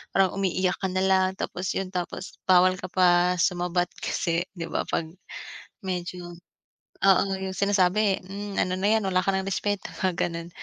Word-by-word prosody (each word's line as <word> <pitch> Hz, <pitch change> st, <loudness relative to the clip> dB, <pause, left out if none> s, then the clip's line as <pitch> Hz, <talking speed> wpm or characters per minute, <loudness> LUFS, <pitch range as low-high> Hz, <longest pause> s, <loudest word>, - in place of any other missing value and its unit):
parang 195 Hz, -2 st, +4 dB
umiiyak 185 Hz, -1 st, 0 dB
ka 190 Hz, -, -1 dB
nalang, 190 Hz, 0 st, +2 dB
tapos 185 Hz, -1 st, -3 dB
yun, 190 Hz, -1 st, -3 dB
tapos 180 Hz, 0 st, -5 dB
bawal 185 Hz, 0 st, +5 dB
ka 185 Hz, -, -5 dB
pa 180 Hz, -1 st, +3 dB
sumabat 175 Hz, 0 st, 0 dB
kasi 170 Hz, +1 st, -1 dB
'di 170 Hz, -2 st, -6 dB
ba -, -, -2 dB
'pag 160 Hz, -1 st, -2 dB, 0.7 s
medyo, 180 Hz, -1 st, -4 dB, 0.7 s
oo, 195 Hz, -2 st, +6 dB
yung 190 Hz, 0 st, -4 dB
sinasabi, 200 Hz, +1 st, +2 dB
hmm, 200 Hz, +1 st, -6 dB
ano 185 Hz, 0 st, 0 dB
na 200 Hz, -, +2 dB
yan 220 Hz, -, -1 dB
wala 185 Hz, -1 st, +2 dB
ka 185 Hz, -, -5 dB
ng 190 Hz, -, -1 dB
respeto, 200 Hz, +1 st, -2 dB
mga 185 Hz, -2 st, 0 dB
ganun. 170 Hz, -1 st, -2 dB
185 Hz, 165 wpm, -26 LUFS, 180-190 Hz, 0.7 s, oo